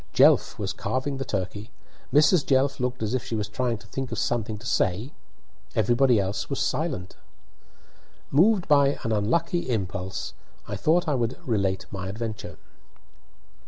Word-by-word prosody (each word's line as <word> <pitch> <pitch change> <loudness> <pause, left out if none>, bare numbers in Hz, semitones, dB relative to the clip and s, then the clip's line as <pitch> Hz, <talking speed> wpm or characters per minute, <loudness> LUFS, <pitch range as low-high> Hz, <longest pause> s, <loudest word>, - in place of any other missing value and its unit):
Jelf - - +5
was - - -2
carving 135 +2 -2
the 135 - -3
turkey; 100 +2 -4 0.4
Mrs. 150 +2 +5
Jelf 135 +1 +2
looked 125 -1 -2
as 110 +2 -1
if 130 - 0
she 115 - -4
was 105 -2 -2
trying 120 +2 -1
to 105 - -17
think 130 +4 -5
of - - -3
something 110 -3 -1
to 110 - -13
say; 110 - 0 0.6
everybody 120 +2 +4
else 100 +1 -2
was - - -2
silent. 90 0 -2 1.1
Moved 185 +6 +4
by 140 -2 +4
an 115 - -1
unlucky 165 - 0
impulse, 95 -4 -3 0.3
I - - -3
thought 165 - +2
I 150 - +2
would 120 -2 -1
relate 100 -5 0
my 95 -1 -5
adventure. 105 -5 -5
115 Hz, 155 wpm, -26 LUFS, 105-135 Hz, 1.1 s, Jelf